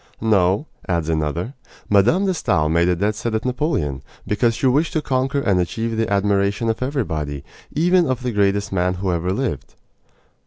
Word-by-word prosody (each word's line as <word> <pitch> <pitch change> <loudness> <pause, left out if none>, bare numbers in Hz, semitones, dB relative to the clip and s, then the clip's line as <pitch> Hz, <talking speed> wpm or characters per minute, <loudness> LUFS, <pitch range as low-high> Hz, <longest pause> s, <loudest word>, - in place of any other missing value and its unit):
"No," 100 - +2 0.2
adds 85 -3 0
another, 80 - -1 0.3
"Mme. 100 -1 +5 0.2
de 190 - +1
Stael 80 - +1
made 85 +2 +3
a 90 - +2
dead 100 +5 0
set 110 +1 -3
at 110 - -2
Napoleon, 125 - -1 0.2
because 115 +2 +1
she 125 - -2
wished 140 +6 +2
to 155 - +1
conquer 130 +1 0
and 100 -7 +2
achieve 115 +6 -2
the 110 -2 -1
admiration 100 +2 +1
of 110 - -7
everybody, 80 - -2 0.3
even 175 +2 +3
of 130 -1 -2
the 125 - -1
greatest 100 -1 +1
man 90 -1 0
who 95 0 -1
ever 85 +2 -1
lived." 95 - -3
105 Hz, 180 wpm, -21 LUFS, 90-125 Hz, 0.3 s, Mme